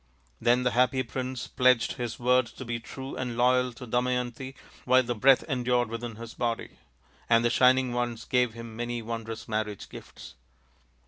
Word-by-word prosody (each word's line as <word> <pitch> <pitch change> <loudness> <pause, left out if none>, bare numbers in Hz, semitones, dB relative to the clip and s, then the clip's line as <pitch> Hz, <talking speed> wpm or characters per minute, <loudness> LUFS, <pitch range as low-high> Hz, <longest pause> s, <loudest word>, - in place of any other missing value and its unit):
" - - -35
Then 120 +2 +3
the 125 - +2
happy 125 +2 +2
prince 130 +1 -4
pledged 125 -2 +3
his 120 -2 -5
word 125 0 +3
to 130 - -10
be 120 0 -3
true 135 +3 -8
and 125 -2 -4
loyal 125 +1 +3
to 125 - -9
Damayanti 125 +2 -2 0.3
while 130 +1 +4
the 120 0 -2
breath 130 +4 +5
endured 125 -4 0
within 115 0 -5
his 115 +1 -9
body; 115 -1 -3 0.5
and 115 0 +4
the 120 - +3
Shining 130 0 +4
Ones 120 -1 -2
gave 125 -3 +1
him 115 -1 -9
many 120 0 -3
wondrous 115 0 -6
marriage 105 -2 -3
gifts. - - -11
120 Hz, 175 wpm, -28 LUFS, 115-125 Hz, 0.5 s, breath